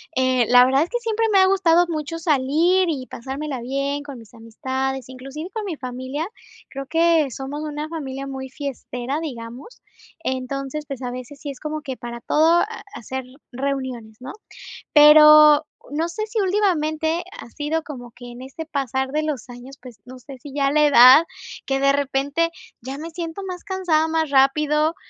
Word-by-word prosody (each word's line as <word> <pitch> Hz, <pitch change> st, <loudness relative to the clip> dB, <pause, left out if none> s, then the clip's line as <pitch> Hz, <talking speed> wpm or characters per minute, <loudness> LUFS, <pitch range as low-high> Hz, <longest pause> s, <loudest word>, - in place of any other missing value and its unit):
eh, 255 Hz, -2 st, +2 dB
la 245 Hz, 0 st, +7 dB
verdad 270 Hz, +3 st, +3 dB
es 340 Hz, -, -6 dB
que 485 Hz, -, -2 dB
siempre 455 Hz, -1 st, -1 dB
me 390 Hz, -, +6 dB
ha 380 Hz, -, +6 dB
gustado 350 Hz, -3 st, +3 dB
mucho 315 Hz, +1 st, -4 dB
salir 325 Hz, +5 st, +2 dB
y 270 Hz, -6 st, -3 dB
pasármela 270 Hz, +1 st, -6 dB
bien 275 Hz, +3 st, -2 dB
con 280 Hz, -4 st, -9 dB
mis 225 Hz, -, -16 dB
amistades, 260 Hz, +3 st, -4 dB
inclusive 270 Hz, +6 st, -8 dB
con 440 Hz, -2 st, -5 dB
mi 365 Hz, -5 st, -4 dB
familia. 260 Hz, +4 st, -5 dB, 0.4 s
Creo 275 Hz, 0 st, -6 dB
que 325 Hz, -2 st, +2 dB
somos 275 Hz, +4 st, -6 dB
una 300 Hz, 0 st, -5 dB
familia 275 Hz, -4 st, -6 dB
muy 265 Hz, -1 st, -6 dB
fiestera, 265 Hz, 0 st, -5 dB
digamos. 250 Hz, -, -8 dB, 0.4 s
Entonces, 275 Hz, +1 st, -4 dB
pues, 270 Hz, -2 st, -7 dB
a 250 Hz, -, -3 dB
veces 255 Hz, +3 st, -8 dB
sí 290 Hz, -, -6 dB
es 270 Hz, -, -8 dB
como 305 Hz, 0 st, -5 dB
que 265 Hz, -3 st, -6 dB
para 235 Hz, 0 st, -8 dB
todo, 320 Hz, +7 st, +3 dB
ah, 450 Hz, +2 st, -5 dB
hacer 260 Hz, +3 st, -6 dB, 0.3 s
reuniones, 255 Hz, -4 st, -4 dB
¿no?, 260 Hz, -, -7 dB, 0.6 s
pero 300 Hz, 0 st, +8 dB, 0.2 s
no 315 Hz, +3 st, -1 dB
sé 385 Hz, +6 st, -4 dB
si 440 Hz, +1 st, -3 dB
últimamente 340 Hz, -5 st, 0 dB, 0.2 s
ha -, -, -11 dB
sido 305 Hz, +5 st, -3 dB
como 245 Hz, -6 st, -9 dB
que 245 Hz, +1 st, -12 dB
en 240 Hz, -, -11 dB
ese 270 Hz, +5 st, -8 dB
pasar 265 Hz, -3 st, -2 dB
de 305 Hz, +2 st, 0 dB
los 290 Hz, -6 st, -4 dB
años, 245 Hz, +3 st, -11 dB
pues, 250 Hz, -4 st, -13 dB
no 255 Hz, +1 st, -11 dB
sé 265 Hz, +2 st, -12 dB
si 270 Hz, +2 st, -12 dB
ya 275 Hz, -1 st, +1 dB
la 300 Hz, +1 st, +4 dB
edad, 265 Hz, +3 st, +8 dB, 0.4 s
que 270 Hz, 0 st, -1 dB
de 275 Hz, -, +4 dB
repente 285 Hz, +4 st, 0 dB, 0.3 s
ya 265 Hz, +3 st, -6 dB
me 320 Hz, +2 st, -7 dB
siento 335 Hz, +2 st, -6 dB
más 365 Hz, -2 st, -7 dB
cansada 360 Hz, -5 st, +1 dB
más 320 Hz, -2 st, 0 dB
rápido, 300 Hz, +3 st, +2 dB
285 Hz, 180 wpm, -22 LUFS, 260-320 Hz, 0.6 s, pero